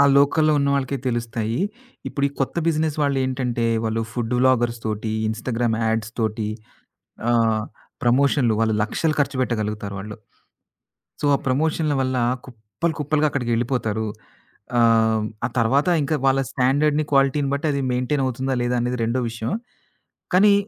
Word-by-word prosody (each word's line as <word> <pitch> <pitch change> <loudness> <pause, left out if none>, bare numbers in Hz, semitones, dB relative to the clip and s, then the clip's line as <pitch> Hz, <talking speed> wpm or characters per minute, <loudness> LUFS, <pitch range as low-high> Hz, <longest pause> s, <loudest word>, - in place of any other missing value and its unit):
ఆ - - +8
లోకల్‌లో 155 +2 +4
ఉన్న 140 0 +1
వాళ్లకే 135 0 -1
తెలుస్తాయి. 115 -1 -2 0.5
ఇప్పుడు 140 - -2
ఈ - - -13
కొత్త 135 - -1
బిజినెస్ 155 -1 0
వాళ్ళేంటంటే, 130 -4 0 0.2
వాళ్లు 110 0 0
ఫుడ్డు 120 0 -2
వ్లాగర్స్‌తోటి, 115 -4 +1 0.2
ఇన్‌స్టాగ్రామ్ 115 0 -1
యాడ్స్‌తోటి 110 -1 -1 0.8
ఆహ్, 115 -2 +2 0.4
ప్రమోషన్లు 125 -1 +3
వాళ్లు 110 -1 +2
లక్షలు 155 +8 -1
ఖర్చుపెట్టగలుగుతారు 110 -7 -1
వాళ్లు. 105 +2 -7 1.0
సో, - - 0
ఆ - - 0
ప్రమోషన్ల 155 +3 +1
వల్ల 130 -1 0 0.3
కుప్పలు 120 +8 -4
కుప్పలుగా 150 +1 +1
అక్కడికెళ్లిపోతారు. 120 -4 -1 0.7
ఆహ్, 110 -2 +4 0.2
ఆ - - +1
తర్వాత 135 +8 +2
ఇంకా 145 +2 0
వాళ్ల 135 0 +3
స్టాండర్డ్‌ని, 145 +3 +2
క్వాలిటీని 135 0 +3
బట్టి 140 +3 -1
అది 140 -1 -1
మెయింటైన్ 125 +3 0
అవుతుందా, 130 +1 -1
లేదా 120 +1 0
అనేది 125 0 -2
రెండో 120 +3 0
విషయం. 115 0 -4 0.8
కానీ, 200 +2 +6
125 Hz, 130 wpm, -22 LUFS, 115-140 Hz, 1.0 s, ఆ